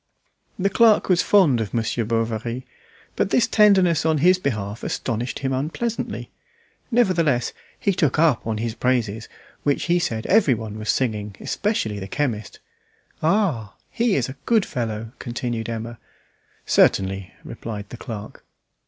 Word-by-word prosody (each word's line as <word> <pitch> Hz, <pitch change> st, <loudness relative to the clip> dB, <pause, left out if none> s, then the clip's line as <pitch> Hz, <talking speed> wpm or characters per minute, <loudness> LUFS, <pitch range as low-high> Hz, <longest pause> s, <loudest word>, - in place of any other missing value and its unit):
The 195 Hz, +1 st, +1 dB
clerk 225 Hz, -1 st, +4 dB
was 180 Hz, -1 st, +4 dB
fond 160 Hz, -, +4 dB
of 110 Hz, +2 st, -4 dB
Monsieur 115 Hz, +1 st, 0 dB
Bovary. 115 Hz, +2 st, -2 dB, 0.5 s
But -, -, +1 dB
this 240 Hz, -, +3 dB
tenderness 190 Hz, -7 st, +4 dB
on 160 Hz, -1 st, +2 dB
his 180 Hz, +5 st, +4 dB
behalf 110 Hz, -, -3 dB
astonished 120 Hz, 0 st, -3 dB
him 135 Hz, -1 st, -2 dB
unpleasantly; 165 Hz, -, -3 dB, 0.6 s
nevertheless 170 Hz, -, +2 dB, 0.3 s
he 200 Hz, -, +1 dB
took 150 Hz, -6 st, +1 dB
up 155 Hz, -8 st, +3 dB
on 110 Hz, -1 st, -1 dB
his 115 Hz, +1 st, -2 dB
praises, 115 Hz, -3 st, -1 dB, 0.3 s
which 145 Hz, -1 st, 0 dB
he 175 Hz, 0 st, +2 dB
said 110 Hz, -9 st, -2 dB
everyone 115 Hz, -, +2 dB
was 110 Hz, -, -5 dB
singing, 105 Hz, -5 st, -1 dB
especially 115 Hz, -, -1 dB
the 95 Hz, -, -6 dB
chemist. 115 Hz, -3 st, -3 dB, 0.6 s
"Ah! 155 Hz, -, +1 dB, 0.2 s
he 235 Hz, -3 st, +1 dB
is 130 Hz, -3 st, +1 dB
a 130 Hz, -, -8 dB
good 225 Hz, -4 st, +3 dB
fellow," 115 Hz, -2 st, -4 dB
continued 120 Hz, -2 st, -3 dB
Emma. 115 Hz, 0 st, -5 dB, 0.7 s
"Certainly," 95 Hz, -1 st, +2 dB
replied 105 Hz, -3 st, -7 dB
the 120 Hz, -, -8 dB
clerk. 110 Hz, -3 st, -8 dB
125 Hz, 140 wpm, -23 LUFS, 110-175 Hz, 0.7 s, clerk